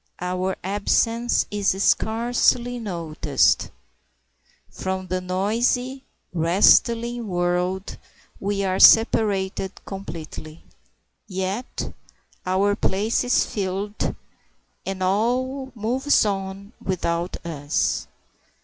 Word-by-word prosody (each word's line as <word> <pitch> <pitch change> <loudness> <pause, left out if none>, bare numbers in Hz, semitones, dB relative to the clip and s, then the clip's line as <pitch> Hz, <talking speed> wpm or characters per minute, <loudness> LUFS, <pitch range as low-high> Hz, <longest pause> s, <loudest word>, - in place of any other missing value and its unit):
Our 185 +1 -2
absence 225 +5 +1
is 205 -2 +1
scarcely 240 +2 +2
noticed. 170 -8 +1 1.0
From 190 0 -4
the 185 0 -2
noisy, 235 +8 0 0.3
wrestling 230 +7 +3
world 180 +1 -1 0.4
we 200 0 -1
are 190 -1 0
separated 200 -4 +4
completely; 165 -4 -8 0.6
yet 190 +5 -4 0.5
our 195 +2 +2
place 210 +3 0
is 245 0 +2
filled, 200 +1 -3 0.7
and 190 -1 -3
all 255 +7 0
moves 245 +4 +2
on 195 +1 -4
without 175 -1 -2
us. 145 -3 -1
195 Hz, 80 wpm, -23 LUFS, 185-230 Hz, 1.0 s, separated